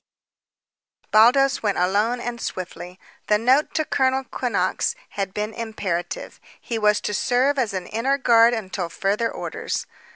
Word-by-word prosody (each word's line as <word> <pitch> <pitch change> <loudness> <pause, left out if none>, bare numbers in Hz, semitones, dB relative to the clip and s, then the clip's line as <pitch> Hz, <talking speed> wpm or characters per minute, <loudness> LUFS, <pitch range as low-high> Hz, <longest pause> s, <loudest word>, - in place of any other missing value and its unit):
B." - - -34
Baldos 250 +5 +5
went 205 -3 0
alone 205 +7 +1
and 240 0 -5
swiftly. 180 0 -6 0.3
The 210 - +4
note 255 +7 +2
to 315 - +1
Colonel 265 -1 +1
Quinnox 215 -8 -1
had 195 -2 -3
been 210 +2 -3
imperative. 215 - -4 0.2
He 230 -2 -4
was 210 -1 +3
to 210 - -3
serve 260 +6 +1
as 230 -6 0
an 185 -1 -3
inner 260 +5 0
guard 235 -3 +5
until 190 -5 -4
further 210 +5 -1
orders. - - -4
225 Hz, 150 wpm, -23 LUFS, 200-250 Hz, 0.3 s, Baldos